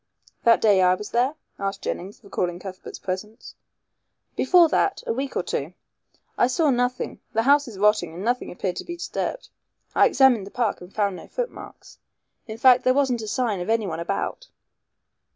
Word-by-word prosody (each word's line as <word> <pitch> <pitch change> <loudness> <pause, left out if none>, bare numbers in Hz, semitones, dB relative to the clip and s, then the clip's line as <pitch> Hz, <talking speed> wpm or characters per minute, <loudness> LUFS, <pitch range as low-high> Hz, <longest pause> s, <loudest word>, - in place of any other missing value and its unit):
"That 230 -1 +5
day 205 -3 +5
I 180 0 +5
was 210 +2 -8
there?" 250 +5 +1 0.2
asked 195 0 -3
Jennings, 195 +6 -5
recalling 180 -3 -2
Cuthbert's 185 0 -9
presence. 210 +5 -6 0.8
"Before 355 -2 +5
that 405 - 0
a 460 - -1
week 275 -5 -3
or - - 0
two. - - -4 0.6
I - - +5
saw 295 +3 +2
nothing. 245 0 -1
The 225 - +2
house 285 +2 +4
is 220 -5 -9
rotting 210 -4 +2
and 185 +4 -6
nothing 245 +2 -1
appeared 180 0 -3
to - - -4
be 345 0 -7
disturbed. - - -4 0.4
I - - +5
examined 250 -7 +4
the - - -8
park 230 -3 -1
and 180 +1 -11
found 200 -3 -1
no - - -11
footmarks. - - -7 0.5
In 220 0 -6
fact, 250 +1 +6
there 255 0 +3
wasn't 265 -4 +1
a 215 - -6
sign 220 -3 -1
of 180 - -5
anyone 205 -8 0
about." 200 - -3
225 Hz, 180 wpm, -24 LUFS, 195-260 Hz, 0.8 s, fact